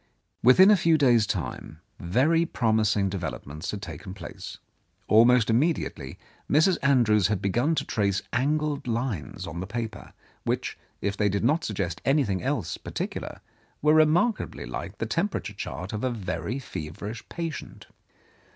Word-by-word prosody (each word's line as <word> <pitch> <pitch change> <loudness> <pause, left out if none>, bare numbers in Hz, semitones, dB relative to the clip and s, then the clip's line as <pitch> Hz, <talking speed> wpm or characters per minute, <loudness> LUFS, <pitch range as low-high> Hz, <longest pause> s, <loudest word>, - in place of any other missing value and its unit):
Within 185 - +7
a - - +7
few 165 -3 +3
days' 120 -7 +4
time 80 - -4 0.2
very 135 - +2
promising 110 -8 +1
develop 95 -1 -4
ments 75 +6 -7
had 105 -1 -4
taken 95 -1 -8
place. - - -8 0.5
Almost 115 +1 +5
immediately 115 - 0 0.3
Mrs. 160 +6 +4
Andrews 115 -8 +4
had 105 -2 0
begun 120 - +1
to 140 - -1
trace 100 -3 0
angled 145 +2 0
lines 115 - -3
on 80 +1 -6
the 95 - -4
paper, 115 +1 -5 0.3
which, - - -2 0.3
if 100 0 -1
they 105 0 +2
did 100 +2 -1
not 150 +7 +2
suggest 95 -6 -3
anything 130 - +1
else - - -2
particu - - -4
lar, - - -8 0.4
were 150 0 +5
remarkably 160 +9 +2
like - - -6
the - - -2
temperature - - -2
chart 90 +3 -6
of 110 - -3
a 130 - +2
very 95 -1 -3
feverish 100 - -6
patient. 165 -2 -6
115 Hz, 150 wpm, -26 LUFS, 100-145 Hz, 0.5 s, Within